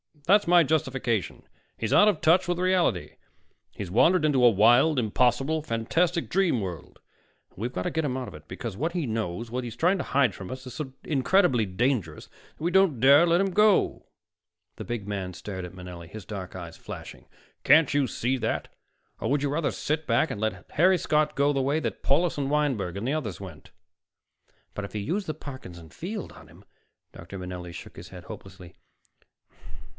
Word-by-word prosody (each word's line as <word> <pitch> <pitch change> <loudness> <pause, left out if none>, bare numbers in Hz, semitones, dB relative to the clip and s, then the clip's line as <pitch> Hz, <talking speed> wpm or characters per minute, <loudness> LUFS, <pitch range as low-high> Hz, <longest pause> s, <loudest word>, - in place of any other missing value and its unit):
That's 205 0 +4
my 175 0 +6
justification. 135 - -1 0.3
He's 115 - -2
out 205 - +6
of 200 -7 +2
touch 175 +3 +4
with 175 -1 0
reality. 180 - 0 0.5
He's 95 -4 -7
wandered 165 - +4
into 140 -4 +3
a 120 - +9
wild, 120 +8 +4
impossible, 125 +6 +1
fantastic 160 +7 0
dream 180 - +2
world. 90 -6 -7 0.5
And - - -31
we've 120 +4 -3
got 90 - -3
to - - -2
get 160 -1 -1
him 130 -2 -2
out 130 -2 -4
of - - -9
it, 75 0 -13
because 95 +2 -6
what 160 +5 -2
he 175 -4 -1
knows, 110 -1 -3
what 125 +1 -2
he's 120 -2 -6
trying 180 +4 +2
to - - -3
hide 130 -5 +2
from 95 -1 -9
us, 130 +1 -7
is 125 - -8
so 130 -2 -5
incredibly 145 - +2
dangerous 95 - -1 0.3
that - - -10
we 170 - +1
don't 190 -9 +3
dare 140 +7 +6
let 170 +2 +3
him 195 -1 0
go." 210 +1 +3 0.7
The - - -7
big 120 -4 -4
man 95 -3 -4
stared 95 0 -6
at 90 - -10
Manelli, 90 -2 -9
his 105 +2 -10
dark 95 -4 -7
eyes 85 -3 -8
flashing. - - -10 0.4
"Can't 150 +1 +5
you 145 -2 +2
see 125 +3 -1
that? 115 -2 -2 0.5
Or - - -2
would 145 +1 +1
you 145 - 0
rather 150 +2 0
sit 155 +1 -2
back 160 - +2
and 105 - -5
let 110 0 -3
Harry 185 +4 +4
Scott 150 -2 +1
go 140 +1 +2
the 135 - 0
way 140 +4 +1
that - - -4
Paulus 165 +5 +2
and 140 -1 -1
Wineberg 135 - 0
and 110 +5 -3
the 140 - 0
others 110 - -4
went?" 90 -6 -11 1.0
"But 100 0 -5
to 105 - -5
use 180 - -2
the 155 - -3
Parkinson 90 - -10
Field 200 - -6
on - - -15
him - - -18 0.3
" - - -55
Dr. 85 +4 -9
Manelli 90 -1 -7
shook 85 - -10
his - - -10
head - - -11
hopelessly. 95 -3 -11
130 Hz, 200 wpm, -26 LUFS, 100-160 Hz, 1.0 s, a